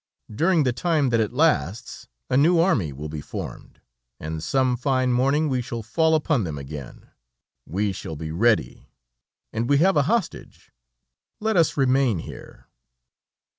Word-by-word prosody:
During 165 - +2
the 125 -2 +1
time 150 +1 +1
that 115 -1 +2
it 110 -2 0
lasts, 120 - 0 0.2
a - - -1
new 160 +6 +4
army 140 - +2
will 75 +3 -7
be 75 -1 -6
formed, - - -8 0.4
and 80 +1 -5
some 130 - +1
fine 130 0 0
morning 135 +5 +2
we 130 -3 0
shall 120 -1 -6
fall 160 +9 +2
upon 150 -6 +1
them 80 -5 -4
again. 70 -1 -9 0.6
We 100 +4 -1
shall 80 -3 -7
be 80 +1 -6
ready, 95 - 0 0.6
and 115 +2 -2
we 145 - +4
have 180 +2 +3
a - - +5
hostage 230 -1 -3 0.7
let 220 0 0
us 165 -4 +2
remain 130 -5 +2
here." 80 - -10
125 Hz, 155 wpm, -24 LUFS, 90-155 Hz, 0.7 s, a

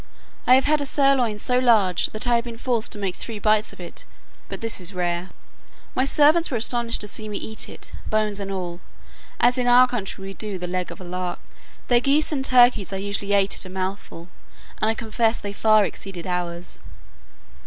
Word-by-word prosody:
I 255 - +8
have 265 - +4
had 300 0 +2
a - - -2
sirloin 270 -6 +2
so 250 +4 +1
large, 220 -8 +3
that 215 - -4
I 240 - +3
have 235 0 +1
been 235 -1 -7
forced 235 -2 -1
to - - -7
make 195 -3 -3
three 225 -2 -4
bites 215 +1 +2
of - - -16
it; 175 - -9 0.5
but - - -5
this 225 -4 -3
is 180 +2 -3
rare. 175 0 -2 0.6
My 260 - +1
servants 305 +4 +4
were 250 - -1
astonished 235 +1 +1
to 210 - -2
see 215 +1 -3
me 205 - -4
eat 220 - -3
it, - - -9 0.2
bones 215 -1 0
and 195 -1 -5
all, 175 -2 -5 0.6
as 245 +1 +3
in 245 - 0
our 250 +1 +7
country 205 -5 -5
we 195 0 -7
do 205 -1 -5
the 180 - -5
leg 180 0 -3
of - - -10
a - - -8
lark. 180 0 -4 0.5
Their 240 -1 +4
geese 280 +6 +2
and 275 -3 -1
turkeys 245 -7 +4
I - - -3
usually 200 +1 -3
ate 195 -1 +3
at - - -2
a - - -8
mouthful, 185 -2 -5 0.5
and 215 - +2
I 225 - +1
confess 225 0 0
they 205 -1 -6
far 215 0 +4
exceed 185 -3 -7
ours. 175 -1 -4
215 Hz, 210 wpm, -23 LUFS, 190-245 Hz, 0.6 s, I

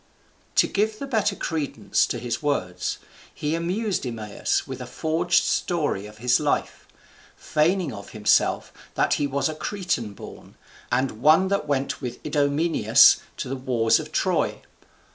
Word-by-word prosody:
To - - +5
give 215 +1 -1
the 280 - -5
better 220 -6 0
credence 155 -7 -1
to - - -3
his 120 -1 -3
words, 90 -12 -2 0.3
he 150 +1 -3
amused 185 +5 -1
Eumaeus 110 -5 -2
with - - -7
a - - -6
forged 160 +2 +1
story 150 - -1
of 105 0 -14
his 125 +2 +2
life; 150 -1 -2 0.5
feigning 165 0 0
of 100 -1 -9
himself 105 -1 +1 0.2
that - - +2
he 145 - +1
was 140 0 0
a 155 - -3
Cretan 155 - -3
born, - - -12 0.4
and 125 -2 -1
one 160 +7 +5
that 200 -6 -1
went 140 -1 -1
with 125 -2 -5
Idomeneus 150 +3 +4 0.2
to - - -4
the 135 - -3
wars 125 -4 +2
of - - -8
Troy. - - 0
145 Hz, 150 wpm, -24 LUFS, 125-170 Hz, 0.5 s, To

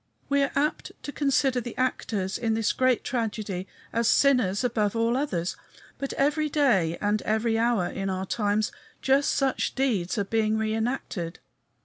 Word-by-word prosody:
We 280 0 +3
are 275 - +1
apt 295 +2 -1
to 290 - -5
consider 275 -3 +1
the 240 -1 -8
actors 210 -6 -1
in 225 -2 0
this 225 -1 +1
great 255 -2 +2
tragedy 215 -6 -3 0.3
as 230 0 +1
sinners 250 -8 +3
above 220 -4 0
all 230 +1 +2
others. 185 - -1 0.4
But 275 - -3
every 300 +2 +1
day 205 - +2
and 210 +1 +1
every 220 +1 0
hour 230 -5 +2
in 195 +2 -3
our 190 0 -2
times 210 +1 0 0.3
just 270 +1 +3
such 270 -2 0
deeds 230 -8 0
are 205 - +1
being 220 +1 +1
reënacted. 220 -6 -2
225 Hz, 155 wpm, -26 LUFS, 205-265 Hz, 0.4 s, We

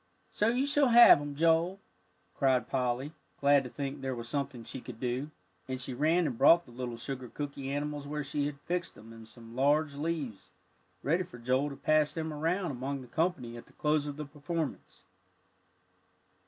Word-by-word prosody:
"So 210 - +1
you 250 +4 +2
shall 285 -1 +3
have 235 -10 +9
'em, 145 -1 -5
Joel," 165 +4 +2 0.5
cried 130 -2 +2
Polly, 130 +2 -1 0.3
glad 140 0 +5
to - - -6
think 140 +1 -5
there 135 -1 -2
was 115 -1 -6
something 140 -2 -3
she 130 - -7
could 120 -3 -9
do, 125 +4 -2 0.4
and 130 -1 -3
she 130 0 -5
ran 160 +7 +2
and 125 -6 -3
brought 170 +1 +6
the 125 - -15
little 120 -1 -5
sugar 130 0 -6
cooky 140 -1 -5
animals 145 0 -3
where 150 0 -3
she 145 +1 -1
had 145 -1 -7
fixed 175 0 -3
them 115 +2 -13
in 115 -1 -12
some 115 0 -13
large 145 +3 +2
leaves 145 -8 -4 0.5
ready 165 +5 +2
for 175 -9 -8
Joel 130 +4 +1
to 140 - -7
pass 155 +1 +2
them 160 -1 -3
around 165 +4 -1
among 135 +2 -4
the 125 - -11
company 135 -4 -1
at 120 - -11
the - - -21
close 150 -1 +1
of 145 0 -5
the 150 - -4
performance. 150 +1 -5
145 Hz, 190 wpm, -31 LUFS, 130-155 Hz, 0.5 s, have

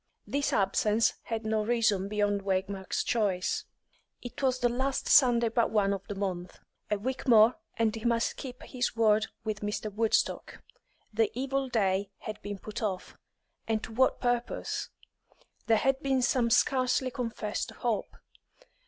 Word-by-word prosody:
This 285 0 -1
absence 210 +3 +2
had 225 -1 -3
no 220 0 +1
reason 215 -4 +1
beyond 205 -1 0
Waymark's 190 0 -2
choice. 200 -6 0 0.5
It 245 - -8
was 260 -2 +2
the 245 - +2
last 260 +3 -1
Sunday 240 -4 +5
but 230 0 +1
one 200 -2 +2
of 195 - -4
the 205 - -5
month; 185 -3 -4 0.3
a 210 - +1
week 255 +6 -4
more, 225 0 +6 0.2
and 225 -1 +1
he 220 - -7
must 235 -1 +1
keep 255 -2 -8
his 245 -3 -2
word 220 -1 +3 0.2
with 215 -2 -3
Mr. 210 0 -3
Woodstock. 225 +1 0 0.5
The 220 +1 +2
evil 270 +1 -1
day 195 -4 +1
had 215 0 -6
been 205 0 -5
put 210 +2 -7
off, 195 -4 -3 0.5
and 225 -1 0
to - - -7
what 260 +3 +2
purpose? 245 -1 -2 0.8
There 225 -1 +5
had 270 +3 +1
been 265 -3 +1
some 240 -1 +2
scarcely 255 +2 +2
confessed 230 -5 -3
hope. 230 -5 -3
225 Hz, 155 wpm, -29 LUFS, 205-245 Hz, 0.8 s, more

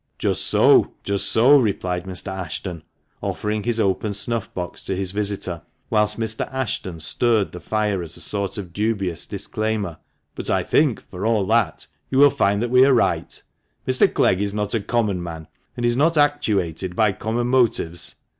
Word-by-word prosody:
"Just - - 0
so, - - +4
just 100 0 0
so," 135 +6 +6
replied 90 -6 -1
Mr. 95 +1 -4
Ashton, 90 -1 -5 0.4
offering 105 0 -2
his 115 +1 -1
open 100 0 0
snuff 115 +2 -1
box 90 -1 -5
to 95 - -2
his 95 -1 -2
visitor, 100 -4 -2 0.3
whilst 105 0 +1
Mrs. 110 0 -2
Ashton 105 -9 -3
stirred 110 +5 +1
the 90 - -8
fire 105 -3 -1
as 85 0 -7
a - - -6
sort 100 -1 -2
of 90 -4 -7
dubious 100 -5 -1
disclaimer; 110 -6 -3 0.3
"but - - -6
I - - +1
think, - - +1
for 90 - -6
all 110 -4 +2
that, 110 -6 +1 0.2
you 130 - -1
will 145 0 +7
find 100 0 +1
we 125 +2 +5
are 135 -1 +5
right; - - 0 0.5
Mr. - - +3
Clegg 95 - +2
is 100 0 -2
not 105 -1 -2
a 115 - +2
common 105 -3 0
man, 80 -2 -7 0.3
and 120 - -1
is 120 0 +2
not 160 +5 +2
actuated 100 - +1
by 110 0 +3
common 110 +4 -2
motives. 120 -9 0
105 Hz, 175 wpm, -22 LUFS, 95-115 Hz, 0.5 s, will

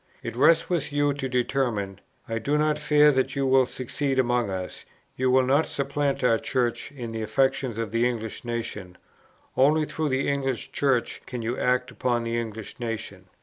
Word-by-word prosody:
It - - -5
rests 160 +6 +4
with 165 -5 -1
you 145 0 +2
to 135 -1 -4
determine. 120 -6 -1 0.3
I 115 0 -2
do 140 +7 0
not 150 0 +1
fear 150 0 +5
that 130 0 0
you 140 0 0
will 130 -1 +4
succeed 135 +2 -2
among 120 -3 +2
us; 95 -1 -5 0.3
you 130 0 +1
will 130 +1 +5
not 140 +5 +3
supplant 140 0 -1
our 115 -3 +4
Church 125 0 -1
in 120 -5 -6
the 115 0 -4
affections 130 +2 0
of 115 -2 -3
the 115 +2 +2
English 115 -3 -5
nation; 115 -6 -5 0.6
only 150 +4 +4
through 155 0 -2
the 130 +1 0
English 135 -4 -1
Church 135 -4 0
can 125 -3 -5
you 115 +2 -1
act 125 0 +1
upon 120 -2 0
the 115 0 -2
English 110 -1 -5
nation. 110 -5 -5
130 Hz, 185 wpm, -26 LUFS, 115-140 Hz, 0.6 s, fear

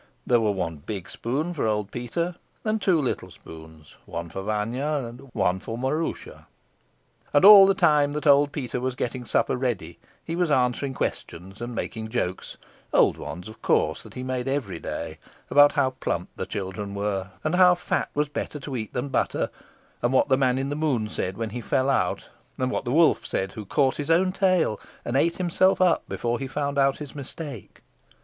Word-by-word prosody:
There 120 -2 +3
were 110 - +2
one 90 -5 -2
big 95 +5 -6
spoon, 145 +9 -2
for 145 -8 -1
old 105 -2 -1
Peter; 145 +9 -2 0.3
and 215 0 0
two 185 -4 +3
little 135 -4 -2
spoons, 80 -1 -13
one 85 0 -5
for 95 - -5
Vanya 120 +9 -1
and 120 +3 -10
one 95 -5 +1
for 115 +4 -6
Maroosia. 145 +6 -3 0.9
And 145 - +6
all 200 -2 +11
the 195 - +3
time 150 -5 +3
that 150 +1 -4
old 145 0 +5
Peter 125 -4 -3
was 130 -1 -2
getting 125 0 -3
supper - - +1
ready 115 -10 -3 0.3
he 165 - -3
was 175 -1 +1
answering 130 0 +1
questions 95 +1 -5
and 120 0 -5
making 110 -1 -4
jokes 100 -6 -3 0.3
old - - +4
ones, 90 +6 -7
of 110 - -12
course, - - +1
that - - -14
he 125 - -5
made 130 0 -2
every 130 -11 -2
day - - -5 0.3
about 145 +2 +7
how 140 -3 +2
plump - - -3
the - - -4
children 100 +1 -5
were, 100 -1 -2
and 155 - 0
how 180 0 +6
fat 175 - -2
was 150 +1 +1
better 150 +1 -5
to 140 -1 -6
eat 110 -4 -4
than 125 +3 -2
butter, 130 - 0 0.5
and 120 - +1
what 130 - +3
the 130 - +5
Man 130 -2 +2
in 135 +1 -2
the 145 - -2
Moon 135 -9 0
said 95 -2 -3
when 115 -2 -3
he 120 - -5
fell 130 +4 +1
out, 90 -9 0 0.3
and 130 0 -1
what - - -2
the 120 - -1
wolf 160 +3 +4
said 95 0 -2
who 105 0 -8
caught 135 +5 +1
his 145 +1 -4
own 180 +3 +4
tail 185 - +2 0.3
and 120 - -2
ate 165 +5 +2
himself 185 +1 +2
up 180 -2 +2
before 120 0 -1
he 135 - -4
found 140 +1 -2
out 135 0 +3
his 150 -2 -8
mistake. 140 - -8
130 Hz, 200 wpm, -25 LUFS, 110-150 Hz, 0.9 s, all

